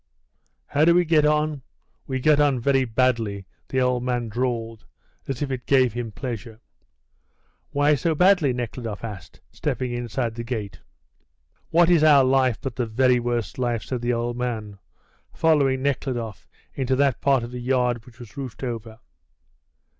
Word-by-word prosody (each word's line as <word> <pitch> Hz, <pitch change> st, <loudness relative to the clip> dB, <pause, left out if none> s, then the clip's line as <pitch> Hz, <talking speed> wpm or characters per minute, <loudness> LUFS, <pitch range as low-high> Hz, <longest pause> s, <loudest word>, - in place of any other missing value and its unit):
"How 145 Hz, -, +1 dB
do 170 Hz, +1 st, +5 dB
we 175 Hz, 0 st, +4 dB
get 155 Hz, -2 st, +4 dB
on? 150 Hz, -1 st, 0 dB, 0.5 s
We 130 Hz, -1 st, -2 dB
get 150 Hz, +2 st, +4 dB
on 145 Hz, -3 st, +3 dB
very 135 Hz, +1 st, +2 dB
badly," 115 Hz, -5 st, 0 dB, 0.2 s
the 130 Hz, -, 0 dB
old 125 Hz, -1 st, +1 dB
man 120 Hz, -2 st, -2 dB
drawled, 115 Hz, -1 st, -3 dB, 0.4 s
as 135 Hz, +1 st, -3 dB
if 140 Hz, -, -3 dB
it 125 Hz, -2 st, -5 dB
gave 130 Hz, -4 st, +4 dB
him 120 Hz, -2 st, -4 dB
pleasure. 115 Hz, -2 st, -6 dB, 1.1 s
"Why 145 Hz, +1 st, +3 dB
so 155 Hz, +4 st, 0 dB
badly?" 180 Hz, -4 st, +4 dB
Nekhludoff 115 Hz, -3 st, -5 dB
asked, 105 Hz, -6 st, -8 dB
stepping 130 Hz, -1 st, -3 dB
inside 120 Hz, 0 st, -3 dB
the 115 Hz, +1 st, -6 dB
gate. 110 Hz, -5 st, -5 dB, 0.9 s
"What 170 Hz, +1 st, +4 dB
is 165 Hz, -3 st, +5 dB
our 145 Hz, -3 st, +7 dB
life 130 Hz, -2 st, +2 dB
but 135 Hz, -4 st, -6 dB
the 120 Hz, -, -1 dB
very 125 Hz, +2 st, +3 dB
worst 120 Hz, -5 st, -3 dB
life?" 120 Hz, -3 st, -1 dB
said 125 Hz, -3 st, -4 dB
the 120 Hz, 0 st, 0 dB
old 120 Hz, 0 st, -2 dB
man, 110 Hz, -5 st, -4 dB, 0.6 s
following 140 Hz, -5 st, +2 dB
Nekhludoff 125 Hz, -6 st, -3 dB, 0.3 s
into 130 Hz, -1 st, 0 dB
that 140 Hz, -2 st, +1 dB
part 135 Hz, -3 st, +3 dB
of 120 Hz, -, -7 dB
the 125 Hz, 0 st, -6 dB
yard 125 Hz, -2 st, 0 dB
which 120 Hz, -2 st, -16 dB
was 120 Hz, +1 st, -12 dB
roofed 135 Hz, -3 st, -7 dB
over. 115 Hz, -3 st, -5 dB
125 Hz, 160 wpm, -24 LUFS, 115-135 Hz, 1.1 s, our